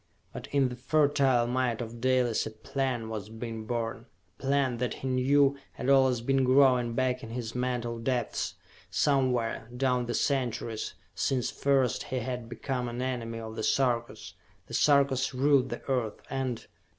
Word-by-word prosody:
But -, -, -7 dB
in 140 Hz, -2 st, +2 dB
the 125 Hz, -, -6 dB
fertile 135 Hz, -2 st, +3 dB
mind 125 Hz, -1 st, 0 dB
of 115 Hz, -1 st, -6 dB
Dalis 125 Hz, -3 st, +2 dB
a -, -, -3 dB
plan 120 Hz, +2 st, -3 dB
was 110 Hz, -2 st, -5 dB
being 115 Hz, -1 st, -6 dB
born 115 Hz, -1 st, -3 dB, 0.3 s
a -, -, -17 dB
plan 135 Hz, -2 st, +1 dB
that, 125 Hz, -1 st, -2 dB
he 135 Hz, -, -6 dB
knew, 135 Hz, +2 st, +3 dB, 0.2 s
had 130 Hz, -, 0 dB
always 130 Hz, -3 st, +4 dB
been 135 Hz, +2 st, +2 dB
growing 125 Hz, -2 st, +4 dB
back 130 Hz, 0 st, 0 dB
in 115 Hz, -, -8 dB
his 115 Hz, -1 st, -5 dB
mental 125 Hz, -2 st, -2 dB
depths, 120 Hz, -1 st, -1 dB, 0.3 s
somewhere, 125 Hz, -5 st, +1 dB
down 125 Hz, -2 st, +1 dB
the 120 Hz, -, -1 dB
centuries, 120 Hz, -5 st, -1 dB, 0.2 s
since 130 Hz, -3 st, 0 dB
first 135 Hz, -4 st, +1 dB
he 130 Hz, -, -3 dB
had 125 Hz, -1 st, -4 dB
become 125 Hz, +1 st, -3 dB
an 120 Hz, +1 st, -5 dB
enemy 120 Hz, -3 st, -3 dB
of 110 Hz, -1 st, -7 dB
the 110 Hz, -, -3 dB
Sarkas. 120 Hz, -1 st, 0 dB, 0.3 s
The -, -, -12 dB
Sarkas 140 Hz, -3 st, +3 dB
ruled 135 Hz, -1 st, +3 dB
the -, -, -6 dB
Earth, 125 Hz, -6 st, -1 dB
and.... 130 Hz, -3 st, -2 dB
125 Hz, 160 wpm, -29 LUFS, 115-135 Hz, 0.3 s, always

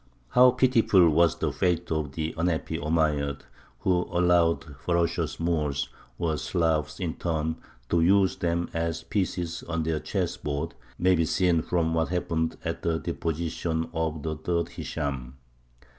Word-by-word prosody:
How 125 Hz, -, +7 dB
pitiful 120 Hz, -9 st, +4 dB
was 85 Hz, +1 st, +3 dB
the -, -, -1 dB
fate 90 Hz, -2 st, 0 dB
of 75 Hz, -3 st, -1 dB
the 80 Hz, +1 st, -3 dB
unhappy 80 Hz, -1 st, -1 dB
Omeyyads, 75 Hz, -3 st, 0 dB, 0.4 s
who 90 Hz, -2 st, +1 dB
allowed 85 Hz, -1 st, +3 dB
the 75 Hz, -, -12 dB
ferocious 85 Hz, +3 st, -1 dB
Moors, 75 Hz, -4 st, 0 dB, 0.3 s
or 80 Hz, -3 st, 0 dB
Slavs, 80 Hz, -5 st, 0 dB
in -, -, -2 dB
turn, 80 Hz, -1 st, -1 dB, 0.3 s
to 85 Hz, -, +3 dB
use 95 Hz, 0 st, +4 dB
them 85 Hz, 0 st, 0 dB
as 80 Hz, 0 st, -2 dB
pieces 85 Hz, -2 st, -2 dB
on 85 Hz, -1 st, -2 dB
their 80 Hz, -1 st, 0 dB
chess -, -, -2 dB
board, 75 Hz, +3 st, -3 dB, 0.2 s
may 90 Hz, +1 st, +4 dB
be 85 Hz, -2 st, +2 dB
seen 85 Hz, 0 st, +2 dB
from 80 Hz, -1 st, 0 dB
what 80 Hz, -1 st, +1 dB
happened 80 Hz, -2 st, -1 dB
at -, -, -3 dB
the 80 Hz, -1 st, 0 dB
deposition 80 Hz, 0 st, -2 dB
of 80 Hz, -2 st, -2 dB
the 80 Hz, -1 st, -2 dB
third 85 Hz, +2 st, -1 dB
Hishām. 65 Hz, -5 st, -4 dB
80 Hz, 150 wpm, -27 LUFS, 80-85 Hz, 0.4 s, How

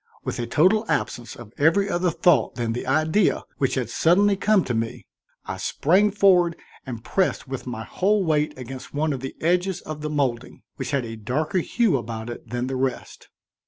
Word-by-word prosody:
With -, -, -4 dB
a 120 Hz, -, -2 dB
total 185 Hz, -, +3 dB
absence 120 Hz, -1 st, -2 dB
of 120 Hz, -2 st, -12 dB
every 165 Hz, +7 st, +4 dB
other 175 Hz, -1 st, +1 dB
thought 175 Hz, +1 st, +2 dB
than 115 Hz, -2 st, -2 dB
the 125 Hz, -, -5 dB
idea 155 Hz, +8 st, +2 dB, 0.2 s
which 135 Hz, -, +1 dB
had 130 Hz, -4 st, -1 dB
suddenly 190 Hz, -, +3 dB
come 200 Hz, -1 st, +3 dB
to 125 Hz, -, -3 dB
me, 115 Hz, 0 st, -3 dB, 0.4 s
I -, -, -5 dB
sprang 190 Hz, +8 st, +2 dB
forward 185 Hz, -4 st, +4 dB, 0.3 s
and 115 Hz, -3 st, -6 dB
pressed 190 Hz, -6 st, 0 dB
with 130 Hz, -1 st, -6 dB
my 115 Hz, -3 st, -4 dB
whole 195 Hz, -, +1 dB
weight 155 Hz, -4 st, 0 dB
against 130 Hz, +2 st, -8 dB
one 150 Hz, +1 st, +1 dB
of 135 Hz, -, -4 dB
the 135 Hz, +1 st, -6 dB
edges 180 Hz, +2 st, +1 dB
of 155 Hz, -1 st, -7 dB
the 150 Hz, -, -3 dB
molding 130 Hz, -5 st, -2 dB
which -, -, -4 dB
had 140 Hz, -4 st, 0 dB
a 115 Hz, 0 st, -7 dB
darker 150 Hz, -, -1 dB
hue 215 Hz, -, +1 dB
about 115 Hz, 0 st, -5 dB
it 120 Hz, -, -10 dB
than 120 Hz, +1 st, -2 dB
the 130 Hz, +1 st, -3 dB
rest. 130 Hz, 0 st, -4 dB
150 Hz, 195 wpm, -24 LUFS, 125-180 Hz, 0.4 s, every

